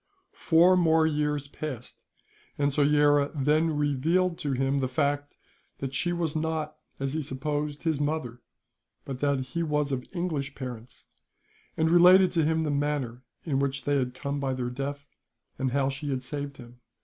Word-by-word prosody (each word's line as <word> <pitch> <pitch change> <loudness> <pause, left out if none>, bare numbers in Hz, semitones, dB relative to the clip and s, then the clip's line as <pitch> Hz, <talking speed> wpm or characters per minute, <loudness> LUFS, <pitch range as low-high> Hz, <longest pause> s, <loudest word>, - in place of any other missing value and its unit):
Four 175 +2 +4
more 160 -2 +4
years 150 -2 0
passed, 140 -5 -7 0.6
and 145 0 +1
Soyera 145 0 +3
then 150 +2 +2
revealed 160 +5 +1
to 145 -2 -2
him 135 +2 +1
the 130 - 0
fact 145 +2 -1 0.4
that 135 -1 -5
she 175 +6 0
was 170 -3 -2
not, 155 -1 -2 0.2
as 135 0 -2
he 160 - -1
supposed, 145 +2 -3
his 160 -4 0
mother, 145 -6 -2 0.6
but 135 -2 -5
that 140 -1 +1
he 130 +6 -4
was 150 -3 0
of 130 -2 -2
English 155 -6 -3
parents; 125 -2 -8 0.7
and 160 - +2
related 180 +2 +7
to 165 -3 +2
him 160 +1 +1
the 150 - -1
manner 140 -4 -1 0.2
in 140 -5 0
which 140 0 -1
they 145 0 +1
had 125 -2 -2
come 140 0 -3
by 135 -1 -1
their 125 -1 -3
death, 140 +2 -5 0.5
and 135 -1 0
how 135 0 +1
she 140 +2 -5
had 130 -2 -2
saved 140 +1 -5
him. 120 -1 -13
145 Hz, 170 wpm, -27 LUFS, 135-155 Hz, 0.7 s, related